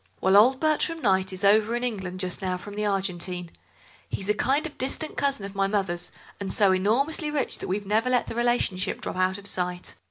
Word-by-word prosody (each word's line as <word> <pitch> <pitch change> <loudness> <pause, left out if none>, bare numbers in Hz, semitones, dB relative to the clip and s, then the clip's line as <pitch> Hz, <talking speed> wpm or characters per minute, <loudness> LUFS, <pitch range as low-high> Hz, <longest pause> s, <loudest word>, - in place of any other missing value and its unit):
"Well, 190 +1 +3
old 250 +6 +6
Bertram 315 +2 +1
Kneyght 190 -2 +2
is 185 +1 -6
over 215 +3 +4
in 240 - -2
England 190 -6 -3
just 185 +1 -2
now 185 -1 -1
from 205 +3 -9
the 210 0 -1
Argentine. 180 -3 -2 0.6
He's 195 +1 -3
a - - +5
kind 270 +8 +1
of 315 - -6
distant 290 +4 0
cousin 275 -8 0
of 195 - -8
my 195 -1 +1
mother's, 190 -4 -1 0.3
and 200 -1 -3
so 200 -2 +5
enormously 260 - +1
rich 295 -3 -1
that - - -5
we've 200 +2 -2
never 220 +5 +1
let 250 -1 +2
the - - -6
relationship 240 -6 0
drop - - -5
out 185 +1 +1
of 200 - -12
sight. 180 -2 -3
200 Hz, 215 wpm, -26 LUFS, 185-245 Hz, 0.6 s, old